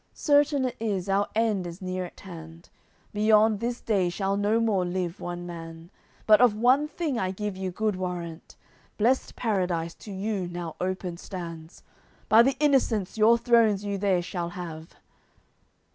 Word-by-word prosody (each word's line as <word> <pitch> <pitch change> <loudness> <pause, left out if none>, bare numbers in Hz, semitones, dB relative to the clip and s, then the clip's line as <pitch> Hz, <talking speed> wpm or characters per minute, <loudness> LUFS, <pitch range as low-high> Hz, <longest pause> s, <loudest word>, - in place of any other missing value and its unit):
Certain 290 -2 +3
it 250 - -3
is, 205 -5 -2
our 195 +1 +1
end 215 -5 +1
is 170 +1 -8
near 185 -1 -3
at - - -13
hand, 165 -3 -11 0.4
Beyond 215 0 +4
this 240 +2 -3
day 195 -5 +1
shall 195 +2 -1
no 205 +3 +1
more 215 -5 +1
live 180 0 -3
one 175 0 -5
man; 165 0 -9 0.3
But 215 +1 +6
of 240 -4 +5
one 255 +7 +3
thing 300 -5 -2
I 185 - -1
give 205 +1 -4
you 190 0 -3
good 210 +3 -1
warrant: 175 -3 -6 0.4
Blest 245 +5 +1
Paradise 180 -7 -1
to 210 - -11
you 195 -1 -2
now 175 -2 -6
open 185 -1 -3
stands, 170 -3 -8 0.5
By 220 +1 +8
the 265 +3 +2
Innocents 255 -9 +2
your 225 +2 +5
thrones 225 -4 +3
you 200 -1 -2
there 190 -3 +1
shall 175 -1 -4
have." 165 -2 -8
195 Hz, 160 wpm, -26 LUFS, 175-220 Hz, 0.5 s, By